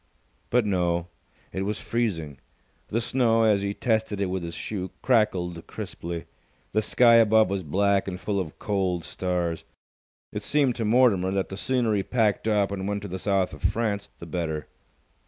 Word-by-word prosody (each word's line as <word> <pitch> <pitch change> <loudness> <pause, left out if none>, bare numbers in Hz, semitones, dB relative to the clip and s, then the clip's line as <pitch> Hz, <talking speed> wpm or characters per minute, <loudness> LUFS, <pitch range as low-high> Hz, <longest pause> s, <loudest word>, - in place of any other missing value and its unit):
But 120 -2 +3
no. 90 -3 0 0.4
It 95 - -2
was 105 +2 -2
freezing. 80 - -2 0.5
The 115 - 0
snow, 115 -2 +2
as 105 -3 +4
he 100 0 -2
tested 110 -4 0
it 95 -2 0
with 95 -1 -2
his 85 -1 -6
shoe, 95 -3 -4
crackled 90 -9 +1
crisply. 85 0 -6 0.5
The 110 - +2
sky 115 +2 +5
above 110 -3 +5
was 100 -1 -1
black 100 +5 +1
and 90 -1 -4
full 100 0 -1
of 80 -5 -5
cold 95 -5 -1
stars. 90 -3 -2 0.7
It 105 - -3
seemed 135 +3 +2
to 115 - -1
Mortimer 105 -5 +4
that 95 0 -1
the 95 - -5
sooner 120 -1 +1
he 100 - +2
packed 110 0 +1
up 105 -2 +2
and 95 -1 -3
went 100 0 -2
to - - -4
the 95 0 -5
South 95 -2 +1
of - - -10
France, 105 -3 -1
the - - -9
better. 80 -3 -3
100 Hz, 175 wpm, -26 LUFS, 90-110 Hz, 0.7 s, sky